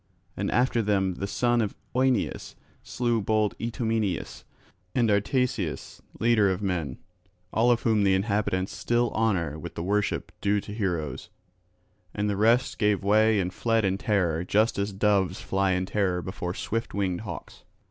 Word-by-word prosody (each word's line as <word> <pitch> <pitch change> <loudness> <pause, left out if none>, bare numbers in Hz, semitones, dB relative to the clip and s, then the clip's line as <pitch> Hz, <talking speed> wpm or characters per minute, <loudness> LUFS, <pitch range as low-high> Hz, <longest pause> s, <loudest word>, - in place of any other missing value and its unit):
And - - -2
after 125 -1 +2
them 100 -3 +1
the 100 +3 -4
son 120 +3 +1
of 105 -3 -2 0.2
Oeneus 130 -3 0 0.3
slew 120 -2 -1
bold 105 -2 +1
Itomeneus, 110 -5 -2 0.5
and 115 -4 +3
Artaceus, 105 - -1 0.2
leader 110 -3 +4
of 95 +2 -2
men; 85 -9 -2 0.6
all 115 +2 +3
of 120 -1 +2
whom 110 -2 +3
the 95 -1 +4
inhabitants 95 -2 -1
still 120 0 +1
honour 85 -9 0
with 85 +2 -8
the 85 - -4
worship 105 +2 -1
due 100 +1 +2
to 100 - -8
heroes. 90 -8 -3 0.9
And 105 0 0
the 100 - 0
rest 115 +5 +2
gave 105 -2 +2
way 110 +1 +4
and 90 -1 -2
fled 115 +1 +1
in 95 0 0
terror 90 -6 +1
just 105 +4 +2
as 100 +1 -1
doves 95 -2 +1
fly 95 -1 0
in 90 0 0
terror 95 -3 0
before 90 -1 -4
swift 115 -1 -3
winged 95 -3 -1
hawks. 95 -6 -8
105 Hz, 155 wpm, -26 LUFS, 95-115 Hz, 0.9 s, leader